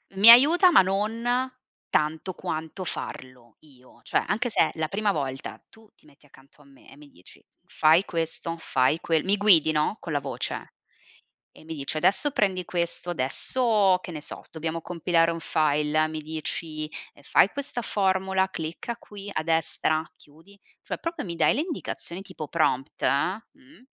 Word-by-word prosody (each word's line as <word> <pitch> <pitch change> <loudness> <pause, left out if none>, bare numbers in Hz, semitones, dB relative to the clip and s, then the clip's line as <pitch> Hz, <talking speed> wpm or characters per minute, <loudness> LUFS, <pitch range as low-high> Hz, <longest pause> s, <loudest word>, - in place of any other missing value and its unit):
Mi 200 +4 +8
aiuta 310 +10 +8
ma - - +7
non 210 +5 -1 0.7
tanto 155 +4 -1
quanto 160 +3 -5
farlo 130 -8 -8
io, 130 -5 -21
cioè - - 0
anche 240 +4 0
se - - -2
è - - -8
la 160 -1 -2
prima 205 +3 0
volta, 135 -3 -5
tu 220 -1 -18
ti - - -28
metti 145 -1 -23
accanto 135 +1 -21
a - - -20
me 140 -1 -20
e 135 - -15
mi 145 -1 -16
dici: 90 -6 -15 0.2
"Fai 160 +4 +3
questo, 165 0 -4
fai 135 +2 +1
que", 160 -3 0
mi 200 +2 +1
guidi, 175 -7 +5
no, 155 +6 0
con 165 - -6
la 145 - +1
voce 135 -2 -5 0.8
e - - -18
mi 160 0 -6
dici: 145 +1 -4
"Adesso 210 - +3
prendi 190 -7 0
questo, 175 0 -3
adesso" 195 - +2
che 180 - -8
ne 150 -2 -7
so, - - -7
"dobbiamo 160 +1 -4
compilare 170 0 +1
un 165 - -5
file", 150 0 +1
mi 155 0 -6
dici, 155 0 -4 0.3
ehm: 145 - -20
"Fai 195 - +4
questa 275 -3 -4
formula, 190 -2 0
clicca 165 +8 -5
qui 205 -1 -10
a 155 - -2
destra, 160 -1 0
chiudi" 165 +8 -20 0.3
cioè, - - -5
proprio 335 -2 -4
mi 170 -2 -5
dai - - +3
le 285 - 0
indicazioni 280 - -5
tipo 155 -5 -8
prompt, 135 +2 -1
mh 220 - -2
165 Hz, 170 wpm, -25 LUFS, 155-200 Hz, 0.8 s, Mi